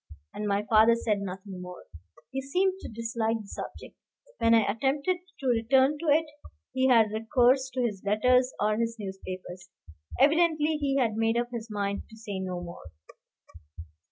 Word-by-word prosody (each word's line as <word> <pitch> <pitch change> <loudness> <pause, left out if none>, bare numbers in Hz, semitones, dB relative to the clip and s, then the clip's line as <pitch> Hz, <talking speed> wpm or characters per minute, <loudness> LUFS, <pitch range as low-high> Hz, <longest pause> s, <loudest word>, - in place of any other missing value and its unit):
And 210 - -4
my 200 +1 0
father 225 +1 +6
said 220 -3 -1
nothing 190 -1 -7
more; 180 0 -10 0.5
he 270 - -3
seemed 370 +8 0
to - - -8
dislike 230 0 -2
the 210 - -11
subject. - - -8 0.4
When 230 0 +5
I 225 - +6
attempted 275 - 0 0.2
to 275 - -8
return 260 +4 +3
to 335 - -5
it, 310 +2 +4 0.5
he 260 0 +2
had 225 -4 +5
recourse 245 +4 +2
to 255 - 0
his 205 -5 -2
letters 250 +5 +3
or 210 +1 +1
his 230 0 -1
newspapers. 190 -2 -8 0.5
Evidently 310 +1 +3
he 280 -2 -1
had 235 -5 +2
made 225 +1 +1
up 240 0 -1
his 235 -1 -6
mind 200 -1 -2
to 220 - -14
say 205 -3 -6
no 185 -1 -4
more. 170 - -10
230 Hz, 165 wpm, -28 LUFS, 205-265 Hz, 0.5 s, father